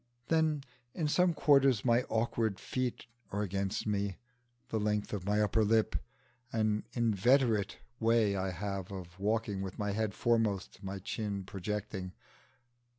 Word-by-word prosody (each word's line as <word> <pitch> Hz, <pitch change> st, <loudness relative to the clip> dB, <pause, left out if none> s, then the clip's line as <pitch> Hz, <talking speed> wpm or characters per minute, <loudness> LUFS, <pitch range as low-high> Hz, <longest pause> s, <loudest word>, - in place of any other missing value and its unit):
Then, 160 Hz, -3 st, +2 dB, 0.3 s
in 160 Hz, -4 st, 0 dB
some 175 Hz, +2 st, +3 dB
quarters 135 Hz, -7 st, +4 dB
my 120 Hz, 0 st, +4 dB
awkward 110 Hz, -2 st, 0 dB
feet 130 Hz, -3 st, -2 dB, 0.3 s
are 105 Hz, +1 st, -1 dB
against 95 Hz, 0 st, -2 dB
me, 100 Hz, -2 st, -1 dB, 0.5 s
the 110 Hz, -, 0 dB
length 105 Hz, 0 st, 0 dB
of 100 Hz, -2 st, -4 dB
my 105 Hz, +1 st, +2 dB
upper 110 Hz, +1 st, +2 dB
lip, 110 Hz, +1 st, +2 dB, 0.6 s
and 110 Hz, -, 0 dB
an 105 Hz, -1 st, +1 dB, 0.3 s
inveterate 110 Hz, -1 st, +3 dB, 0.2 s
way 115 Hz, -3 st, +3 dB
I 95 Hz, 0 st, -1 dB
have 95 Hz, +1 st, -4 dB
of 90 Hz, -1 st, -8 dB
walking 105 Hz, -1 st, 0 dB
with 95 Hz, -1 st, -5 dB
my 105 Hz, -1 st, -1 dB
head 105 Hz, 0 st, -1 dB
foremost 110 Hz, -5 st, +1 dB
and 100 Hz, -, -12 dB
my 95 Hz, +1 st, -3 dB
chin 100 Hz, 0 st, -3 dB
projecting. 95 Hz, 0 st, -4 dB
105 Hz, 150 wpm, -32 LUFS, 100-115 Hz, 0.6 s, quarters